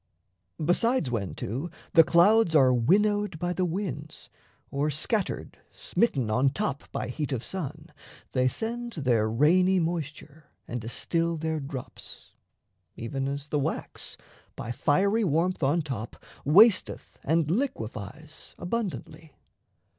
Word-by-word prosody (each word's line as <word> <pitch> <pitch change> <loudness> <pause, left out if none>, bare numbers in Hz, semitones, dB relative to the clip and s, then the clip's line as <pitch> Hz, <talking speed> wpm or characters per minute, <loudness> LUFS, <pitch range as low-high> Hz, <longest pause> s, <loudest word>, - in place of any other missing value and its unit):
Besides 180 - +2
when, 100 -6 -2
too, 130 - -4 0.2
The 165 -3 +8
clouds 175 +2 +4
are 130 -4 +6
winnowed 205 - +2
by 175 +2 -1
the 185 0 0
winds, 160 -5 -5 0.4
or 145 +2 0
scattered 185 - -2
Smitten 135 - 0
on 130 +5 +3
top 145 -2 -3
by - - -3
heat 145 +4 -3
of 125 -3 -2
sun, 160 -3 -6 0.4
they 130 -1 +2
send 235 - -3
Their 120 -8 +1
rainy 180 +10 +4
moisture, 155 -2 -4 0.2
and 120 0 -4
distil 165 +9 -1
their 160 0 -2
drops, 135 -2 -8 0.6
Even 135 +4 -3
as 140 +1 -4
the 150 - +1
wax, 135 - -4 0.4
by 120 - -5
fiery 200 - +2
warmth 175 +1 +1
on 150 +4 +2
top, 120 -6 -5 0.3
Wasteth 190 +7 +4
and 160 +1 +1
liquefies 155 - -4
abundantly. 175 -5 -4
155 Hz, 125 wpm, -27 LUFS, 135-185 Hz, 0.6 s, The